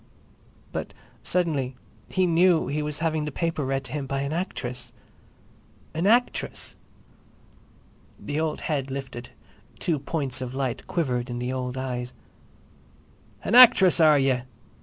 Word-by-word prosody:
But - - -5 0.3
suddenly 145 -8 -1 0.3
he 185 -1 +2
knew 170 -1 +4
he 145 +3 -2
was 150 -1 -3
having 155 -2 0
the 150 - -4
paper 165 0 -2
read 135 0 -1
to 130 - -8
him 140 -1 -3
by 135 0 -2
an 140 +2 -2
actress! 125 -9 -4 1.0
"An 165 +4 0
actress!" 240 +3 +1 1.4
The 145 +1 -3
old 160 -1 -2
head 140 -4 -2
lifted; 130 -2 -6 0.5
two 160 -4 0
points 140 -3 -3
of 130 0 -5
light 130 -3 -3
quivered 125 -7 -1
in 120 - -4
the 125 +1 -3
old 125 0 -3
eyes. 125 -2 -4 1.3
"An - - -2
actress—are 185 -11 +8
ye?" 135 -2 +2
140 Hz, 135 wpm, -25 LUFS, 130-165 Hz, 1.4 s, actress—are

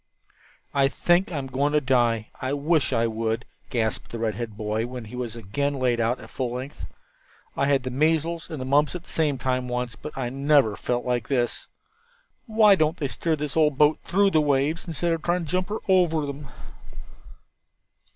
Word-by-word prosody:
"I 140 -1 +4
think 175 +6 +2
I'm 140 -5 -3
going 135 +3 0
to 150 - +5
die. 120 -5 +1
I 130 +2 -1
wish 145 -1 +1
I 115 - +2
would," 115 +1 -2 0.2
gasped 115 -3 -1
the 115 - -5
red 110 -1 -1
headed 115 -3 -6
boy 110 +1 -1
when 125 -2 -7
he 110 +4 -9
was 120 -2 -4
again 130 +7 -2
laid 125 -3 +1
out 115 +3 +1
at - - -12
full 125 -2 -3
length. 130 +3 -6 0.7
"I 140 - +1
had 140 -2 +2
the 130 - -4
measles 160 +4 0
and 155 - -5
the 130 - -4
mumps 145 +5 +2
at 175 - -6
the - - -16
same 150 -4 +1
time 130 0 -1
once, 125 -2 -3
but 150 +6 -9
I 125 -2 -2
never 135 -5 +3
felt 120 +3 -2
like 120 -2 -1
this. 125 -3 -1 0.8
Why 215 -2 +6
don't 160 -2 +2
they 140 -4 -2
steer 160 +4 -1
this 150 -1 -4
old 150 -3 +3
boat 150 +1 +4
through 200 +1 +2
the 155 - +4
waves, 145 +4 +1
instead 170 +1 0
of 165 - -3
trying 175 0 0
to 150 - -7
jump 185 +1 0
her 215 - -2
over 175 -5 +3
them?" 140 0 -6
140 Hz, 200 wpm, -25 LUFS, 120-155 Hz, 0.8 s, Why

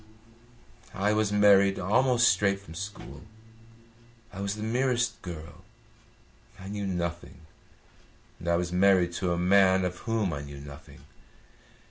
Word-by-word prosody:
"I 100 +1 +1
was 105 -1 0
married 100 -1 +4
almost 120 +6 +2
straight 100 +1 +2
from 100 -5 -13
school. 100 +4 -8 1.1
I 95 - -7
was 100 +1 -2
the 105 - -7
merest 120 -1 -1
girl. 85 -1 -9 1.0
I 95 +1 -9
knew 100 -1 -4
nothing, 85 -2 -5 1.0
and 85 - -9
I 85 - +2
was 85 0 -2
married 90 -2 +3
to 90 -2 0
a 85 - 0
man 95 +1 +4
of 90 0 -4
whom 110 -6 -1
I 70 - -5
knew 70 0 -10
nothing. 70 0 -13
95 Hz, 135 wpm, -27 LUFS, 85-105 Hz, 1.1 s, married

